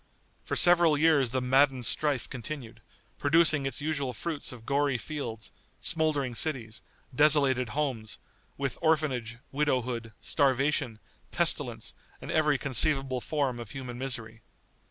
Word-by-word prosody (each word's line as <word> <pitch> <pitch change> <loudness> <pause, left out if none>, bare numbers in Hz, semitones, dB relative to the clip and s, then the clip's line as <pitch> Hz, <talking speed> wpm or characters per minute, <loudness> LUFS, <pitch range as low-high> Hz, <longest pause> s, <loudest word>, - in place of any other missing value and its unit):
For - - -3
several 175 -4 +5
years 145 -4 +4
the 130 +2 -1
maddened 130 0 +3
strife 145 0 0
continued, 130 -1 -7 0.4
producing 155 -2 +3
its 135 +1 -4
usual 140 -4 -2
fruits 155 +5 -4
of 120 -3 -11
gory 140 -1 +1
fields, 115 -4 -6 0.3
smouldering 150 -6 0
cities, 115 -4 -1 0.3
desolated 140 -3 +4
homes, 130 -8 -2 0.4
with 135 -3 -3
orphanage, 135 -8 0
widowhood, 125 -5 -1
starvation, 135 -4 +1 0.3
pestilence, - - -1 0.3
and - - -7
every 150 -2 +2
conceivable 135 -1 +1
form 135 -1 -1
of 115 -3 -8
human 125 -1 -7
misery. 115 -4 -4
135 Hz, 120 wpm, -28 LUFS, 120-150 Hz, 0.4 s, several